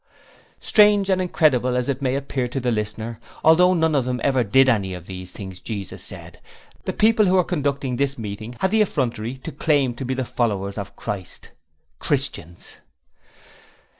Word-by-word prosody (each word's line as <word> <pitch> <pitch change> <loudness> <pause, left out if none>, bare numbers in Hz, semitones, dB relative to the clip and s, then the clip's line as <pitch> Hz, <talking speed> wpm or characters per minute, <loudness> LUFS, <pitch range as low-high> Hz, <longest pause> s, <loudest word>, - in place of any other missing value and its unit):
Strange 205 -2 +4
and 185 0 +2
incredible 135 -8 +2
as 125 - -1
it 140 -1 -2
may 130 -1 0
appear 135 -2 -2
to 125 +3 -3
the 125 -1 0
reader, 110 +1 -3 0.2
although 180 +3 +6
none 160 -2 +2
of 140 -3 +2
them 125 0 -2
ever 135 -3 +2
did 135 +6 +4
any 100 -7 +1
of 90 -2 -10
the 95 0 -7
things 95 -1 -8
Jesus 100 -4 -6
said, - - -10 0.4
the - - -1
people 220 -1 +3
who 185 - +3
were 185 - +5
conducting 140 -6 -2
this 140 +1 0
meeting 110 +2 -6
had 190 - +2
the 220 0 +4
effrontery 125 - -1
to 130 - -7
claim 140 -3 +1
to 120 - -7
be 130 +1 -2
followers 105 -6 -2
of 100 - -7
Christ 100 -5 -6 0.5
Christians! 85 +2 -3
130 Hz, 170 wpm, -22 LUFS, 110-150 Hz, 0.5 s, although